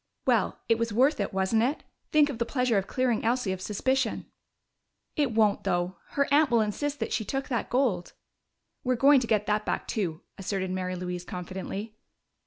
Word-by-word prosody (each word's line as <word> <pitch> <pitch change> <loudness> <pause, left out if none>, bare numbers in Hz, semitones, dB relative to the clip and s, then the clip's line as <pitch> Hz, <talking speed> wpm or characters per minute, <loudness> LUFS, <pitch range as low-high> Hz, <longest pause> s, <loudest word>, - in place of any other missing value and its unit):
"Well, - - +2
it 230 -1 +3
was 230 -1 0
worth 260 +7 +3
it, 200 - -1
wasn't 190 +3 +1
it? 265 +6 0 0.3
Think 300 -1 +4
of 240 - -8
the - - +3
pleasure 250 -6 +2
of 195 - -6
clearing 255 -3 0
Elsie 235 -3 +1
of 185 -1 -4
suspicion!" 250 +5 0 0.9
"It 285 -5 +1
won't, 215 -2 +2
though. 175 +1 -1 0.2
Her 280 -1 +2
aunt 295 0 +5
will 235 -2 +4
insist 285 +7 -2
that 225 - -2
she 220 - 0
took 270 +5 -3
that 235 -5 -1
gold." 240 -9 0 0.7
"We're 255 0 +1
going 275 +3 +6
to 245 - -3
get 210 -2 +2
that 210 0 +1
back - - -2
too," 175 -7 -2 0.2
asserted 190 -1 -2
Mary 185 0 -2
Louise 180 0 -4
confidently. 190 +4 -6
225 Hz, 190 wpm, -28 LUFS, 190-255 Hz, 0.9 s, going